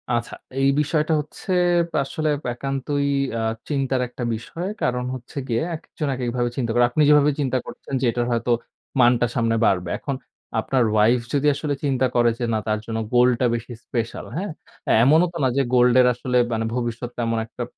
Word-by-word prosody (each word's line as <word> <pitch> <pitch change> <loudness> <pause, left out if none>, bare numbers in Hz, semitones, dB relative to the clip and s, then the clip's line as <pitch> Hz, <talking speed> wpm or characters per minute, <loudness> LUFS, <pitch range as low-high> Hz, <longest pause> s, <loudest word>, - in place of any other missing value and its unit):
আচ্ছা, 115 0 -3 0.3
এই 135 - +4
বিষয়টা 155 +1 +1
হচ্ছে 150 +5 -8 0.2
অ্যাপ 170 0 +1
আসলে 155 +3 -2 0.2
একান্তই 135 +2 -2 0.3
আ - - -1 0.3
চিন্তার 135 -3 0
একটা 125 0 -7
বিষয়। 165 - -6
কারণ 125 0 0
হচ্ছে 125 +2 -11
গিয়ে 115 -1 0
একেকজন 155 -1 -6
একেকভাবে 120 -1 -1
চিন্তা 120 -4 -1
করে। 120 0 +5
আপনি 140 +5 0
যেভাবে 150 0 +6
চিন্তা 130 -2 +1
করছেন - - -10
যেটার 120 0 +1
হয়তো 120 +1 0 0.5
মানটা 120 0 +4
সামনে 115 -2 +1
বাড়বে। 90 -2 +1
এখন 140 - -3 0.4
আপনার 130 -2 +1
wife 115 +3 +4
যদি 145 0 +2
আসলে 145 -1 -2
চিন্তা 130 -2 +1
করে 120 -1 +4
যে 120 - 0
না 110 - +1
তার 110 0 +1
জন্য 115 -1 -3 0.2
gold 125 +1 +5
টা - - +4
বেশি 120 +1 -6
special, 115 -2 -3
হ্যাঁ? 190 +3 -3 0.5
এমনও 160 +7 +5
তো 170 - -5
না - - +4
যে 140 - +4
gold 125 0 +5
এর 125 - +5
আসলে 125 +1 -1 0.2
মানে 115 0 -1
ভবিষ্যতে 120 0 -3
তেমন 115 -1 0
একটা, 120 +2 -6
125 Hz, 180 wpm, -23 LUFS, 120-140 Hz, 0.5 s, যেভাবে